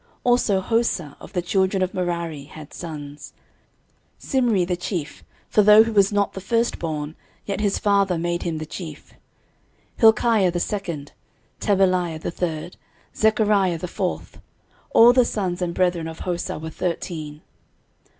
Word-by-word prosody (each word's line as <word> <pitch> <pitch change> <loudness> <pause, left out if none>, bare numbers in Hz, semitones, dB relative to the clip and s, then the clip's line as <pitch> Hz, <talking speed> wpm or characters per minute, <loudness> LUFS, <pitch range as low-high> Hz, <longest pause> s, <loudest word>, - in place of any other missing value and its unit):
13:026:010 - - -35
Also 240 -6 +2
Hosah, 190 -9 -1
of - - -13
the 180 - 0
children 190 +1 +1
of 185 - -2
Merari, 170 -5 -3
had 155 0 -12
sons; 150 -3 -8 0.9
Simri 235 - +1
the 180 - 0
chief, 175 -3 -5 0.2
(for 210 - +3
though 210 +1 +8
he 225 - -3
was 200 -2 +4
not 205 -1 +1
the 190 - -7
firstborn, 165 -8 -1 0.3
yet 200 0 -3
his 200 -2 +1
father 200 -3 +2
made 175 +1 -2
him 165 -2 -2
the 155 - -5
chief;) 155 -2 -9 0.8
13:026:011 - - -15
Hilkiah 220 -4 +5
the 175 - -2
second, 170 -8 -4 0.5
Tebaliah 185 -5 +1
the 160 - -4
third, 170 -1 -4 0.4
Zechariah 210 -5 +2
the 180 - -5
fourth: 180 +1 -4 0.5
all 235 +2 +7
the 255 0 +5
sons 185 -6 -2
and 175 -1 -2
brethren 175 -3 +1
of 160 0 -8
Hosah 175 -4 -3
were 160 +1 -6
thirteen. 155 -3 -4
180 Hz, 150 wpm, -23 LUFS, 165-205 Hz, 0.9 s, though